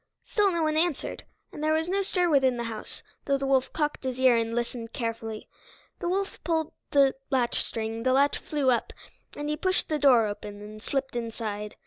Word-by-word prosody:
Still 415 Hz, -3 st, +3 dB
no 340 Hz, -2 st, 0 dB
one 310 Hz, 0 st, +1 dB
answered, 330 Hz, -2 st, -1 dB, 0.3 s
and 300 Hz, -, -7 dB
there 310 Hz, 0 st, +3 dB
was 320 Hz, +1 st, +1 dB
no 390 Hz, +2 st, +1 dB
stir 360 Hz, -2 st, +1 dB
within 265 Hz, -5 st, +4 dB
the 235 Hz, -, -2 dB
house, 225 Hz, -2 st, -5 dB, 0.2 s
though 275 Hz, -1 st, +2 dB
the 275 Hz, -, -3 dB
wolf 265 Hz, -1 st, +2 dB
cocked 300 Hz, -2 st, -1 dB
his 260 Hz, -1 st, -3 dB
ear 260 Hz, -2 st, +6 dB
and 230 Hz, 0 st, 0 dB
listened 235 Hz, -1 st, -3 dB
carefully. 225 Hz, -2 st, -4 dB, 0.5 s
The 345 Hz, -, -1 dB
wolf 390 Hz, +2 st, -2 dB
pulled 320 Hz, -2 st, 0 dB, 0.2 s
the 275 Hz, -2 st, +5 dB, 0.2 s
latchstring, 230 Hz, -3 st, -1 dB
the 255 Hz, +2 st, +2 dB
latch 280 Hz, +2 st, +3 dB
flew 285 Hz, -4 st, +1 dB
up, 240 Hz, -, 0 dB, 0.4 s
and 295 Hz, -, -4 dB
he 300 Hz, -, 0 dB
pushed 370 Hz, +4 st, 0 dB
the 305 Hz, -1 st, 0 dB
door 255 Hz, -5 st, +6 dB
open, 205 Hz, 0 st, -5 dB
and 210 Hz, +1 st, -10 dB
slipped 270 Hz, +1 st, -2 dB
inside. 220 Hz, -3 st, -4 dB
265 Hz, 195 wpm, -27 LUFS, 230-310 Hz, 0.5 s, ear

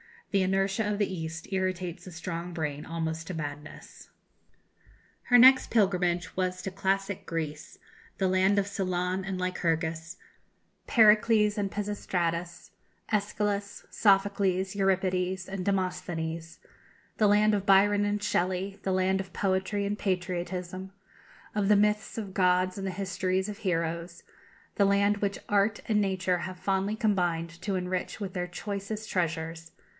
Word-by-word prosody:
The 195 Hz, -, +3 dB
inertia 195 Hz, +3 st, +1 dB
of 205 Hz, -, -1 dB
the 200 Hz, -2 st, 0 dB
East 165 Hz, 0 st, -6 dB
irritates 185 Hz, -2 st, -2 dB
a -, -, -8 dB
strong 170 Hz, +1 st, -5 dB
brain 150 Hz, -3 st, -3 dB
almost 160 Hz, 0 st, -3 dB
to 185 Hz, -, -4 dB
madness. 150 Hz, -1 st, -8 dB, 1.1 s
Her 245 Hz, -, +5 dB
next 260 Hz, +2 st, +7 dB
pilgrimage 180 Hz, -4 st, +1 dB
was 185 Hz, 0 st, -1 dB
to 190 Hz, -, -4 dB
classic 195 Hz, 0 st, -1 dB
Greece, 155 Hz, -2 st, -5 dB, 0.4 s
the 190 Hz, -1 st, +1 dB
land 190 Hz, +2 st, +3 dB
of 200 Hz, -, +3 dB
Solon 185 Hz, -1 st, -2 dB
and 195 Hz, -1 st, -3 dB
Lycurgus, 165 Hz, -2 st, -2 dB, 0.7 s
Pericles 215 Hz, -2 st, +5 dB
and 200 Hz, -1 st, 0 dB
Pisistratus, 180 Hz, -4 st, -3 dB, 0.4 s
Æschylus, 205 Hz, -1 st, -1 dB
Sophocles, 195 Hz, -2 st, +2 dB
Euripides, 190 Hz, -2 st, 0 dB
and 190 Hz, -1 st, -4 dB
Demosthenes 170 Hz, -4 st, -2 dB, 0.6 s
the 215 Hz, -, +4 dB
land 210 Hz, +1 st, +4 dB
of 200 Hz, -1 st, 0 dB
Byron 205 Hz, +1 st, +5 dB
and 205 Hz, 0 st, -1 dB
Shelley 185 Hz, +2 st, -1 dB
the 190 Hz, -, 0 dB
land 185 Hz, +1 st, +2 dB
of 190 Hz, -1 st, -6 dB
poetry 195 Hz, +1 st, 0 dB
and 205 Hz, +1 st, -2 dB
patriotism, 185 Hz, 0 st, -3 dB, 0.6 s
of 205 Hz, -2 st, 0 dB
the 210 Hz, -, +6 dB
myths 210 Hz, +2 st, +1 dB
of 200 Hz, -4 st, -5 dB
gods 185 Hz, 0 st, +2 dB
and 195 Hz, -1 st, -3 dB
the -, -, -1 dB
histories 190 Hz, 0 st, -1 dB
of 210 Hz, +1 st, -7 dB
heroes 170 Hz, -1 st, -2 dB, 0.5 s
the 200 Hz, -, +4 dB
land 200 Hz, +1 st, +3 dB
which 200 Hz, -1 st, -2 dB
Art 205 Hz, +1 st, +2 dB
and 215 Hz, -2 st, +2 dB
Nature 185 Hz, -2 st, 0 dB
have 185 Hz, +1 st, -6 dB
fondly 195 Hz, +2 st, 0 dB
combined 175 Hz, -6 st, 0 dB
to 200 Hz, -2 st, -1 dB
enrich 180 Hz, +1 st, -3 dB
with 195 Hz, -2 st, -3 dB
their 180 Hz, -1 st, -2 dB
choicest 200 Hz, +4 st, -5 dB
treasures. 165 Hz, -2 st, -2 dB
190 Hz, 140 wpm, -28 LUFS, 175-200 Hz, 1.1 s, next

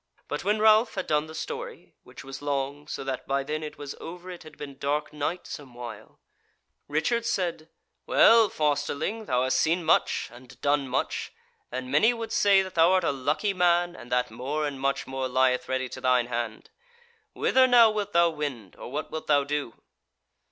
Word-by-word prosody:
But 145 Hz, -, -4 dB
when 210 Hz, +3 st, +2 dB
Ralph 220 Hz, +2 st, +5 dB
had 190 Hz, -, -2 dB
done 150 Hz, 0 st, +1 dB
the 160 Hz, -, -10 dB
story -, -, -7 dB
(which -, -, -13 dB
was 135 Hz, 0 st, -8 dB
long, 145 Hz, 0 st, -3 dB
so -, -, -5 dB
that 135 Hz, -1 st, -4 dB
by 140 Hz, 0 st, 0 dB
then 155 Hz, +2 st, -3 dB
it 155 Hz, -1 st, -7 dB
was 145 Hz, -1 st, -6 dB
over 180 Hz, +2 st, -8 dB
it 175 Hz, -, -9 dB
had 155 Hz, -, -13 dB
been 140 Hz, -2 st, -9 dB
dark 150 Hz, +2 st, -1 dB
night 150 Hz, +4 st, -3 dB
some 135 Hz, -4 st, -9 dB
while), 120 Hz, -3 st, -9 dB, 0.7 s
Richard 165 Hz, +11 st, 0 dB
said: 175 Hz, -8 st, -2 dB, 0.4 s
"Well, 225 Hz, -2 st, +6 dB
fosterling, 150 Hz, +8 st, -1 dB
thou 125 Hz, -5 st, +1 dB
hast 130 Hz, -, +1 dB
seen 170 Hz, +2 st, +1 dB
much, -, -, +2 dB
and 125 Hz, +1 st, -15 dB
done 145 Hz, -1 st, +1 dB
much, 125 Hz, -, -2 dB, 0.4 s
and 130 Hz, 0 st, -5 dB
many 220 Hz, -, +4 dB
would 230 Hz, -1 st, -6 dB
say 200 Hz, -1 st, +4 dB
that 190 Hz, -, -8 dB
thou 165 Hz, +2 st, +5 dB
art 185 Hz, -1 st, +3 dB
a 165 Hz, -, +2 dB
lucky 150 Hz, +9 st, -1 dB
man, 175 Hz, -1 st, +2 dB
and 120 Hz, -, -12 dB
that 125 Hz, -1 st, +1 dB
more 140 Hz, +7 st, -3 dB
and 140 Hz, -2 st, -4 dB
much 140 Hz, 0 st, 0 dB
more 130 Hz, 0 st, -3 dB
lieth 125 Hz, 0 st, +1 dB
ready 130 Hz, 0 st, -1 dB
to -, -, -8 dB
thine 125 Hz, -1 st, +3 dB
hand. 120 Hz, -2 st, -5 dB, 0.6 s
Whither 260 Hz, 0 st, +4 dB
now 235 Hz, -3 st, +7 dB
wilt 210 Hz, -1 st, -3 dB
thou 170 Hz, -2 st, +4 dB
wend, 140 Hz, -, -5 dB
or -, -, -9 dB
what -, -, -4 dB
wilt 160 Hz, -, -5 dB
thou 145 Hz, -1 st, +4 dB
do?" 140 Hz, -4 st, -4 dB
150 Hz, 195 wpm, -27 LUFS, 130-180 Hz, 0.7 s, now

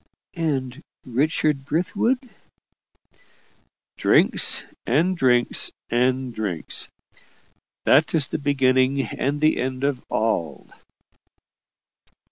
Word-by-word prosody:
"And 145 Hz, -5 st, -3 dB, 0.2 s
Richard 140 Hz, +2 st, 0 dB
Brithwood?" 180 Hz, -, 0 dB, 1.8 s
"Drinks -, -, +3 dB, 0.2 s
and 165 Hz, +9 st, +2 dB
drinks 125 Hz, -6 st, +3 dB, 0.2 s
and 125 Hz, +1 st, 0 dB
drinks. 100 Hz, -8 st, -4 dB, 1.0 s
That 155 Hz, +3 st, +4 dB
is 150 Hz, -3 st, +4 dB
the -, -, -4 dB
beginning 135 Hz, -1 st, +2 dB
and 140 Hz, +5 st, -3 dB
the 155 Hz, 0 st, +3 dB
end 130 Hz, +1 st, -3 dB
of 140 Hz, -3 st, -1 dB
all." 105 Hz, -7 st, -2 dB
135 Hz, 85 wpm, -23 LUFS, 125-150 Hz, 1.8 s, That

